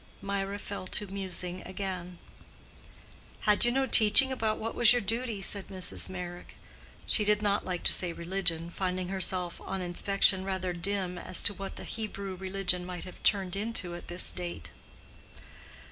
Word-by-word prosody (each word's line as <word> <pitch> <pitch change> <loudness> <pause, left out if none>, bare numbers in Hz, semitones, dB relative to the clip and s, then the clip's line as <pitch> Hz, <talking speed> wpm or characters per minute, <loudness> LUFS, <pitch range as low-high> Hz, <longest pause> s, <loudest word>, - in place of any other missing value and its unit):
Mirah 200 0 -3
fell 200 -2 -6
to 205 - -2
musing 185 -2 -3
again. 185 -2 -6 1.2
"Had 210 +2 +4
you 240 - +3
no 270 +2 +2
teaching 225 +2 +7
about 220 -4 -1
what 225 +1 -4
was 240 -1 +6
your 245 - +2
duty?" 225 -1 -2
said 200 -1 +2
Mrs. 185 -1 -2
Meyrick. 180 -1 -7 0.5
She 215 - +1
did 210 0 +2
not 205 0 +1
like 180 -2 -3
to - - +6
say 180 -2 +2
"religion"—finding 180 +1 -2
herself 185 -2 -1
on 195 0 -4
inspection 190 +1 +2
rather 190 -2 -2
dim 180 0 -2
as 180 - 0
to 205 - +5
what 195 0 -7
the - - -8
Hebrew 200 -3 -4
religion 185 -1 -1
might 180 -1 -6
have 185 - -11
turned 195 -3 +2
into 200 -4 -2
at 175 - -9
this 175 +1 +3
date. 175 -1 -6
190 Hz, 160 wpm, -30 LUFS, 180-205 Hz, 1.2 s, teaching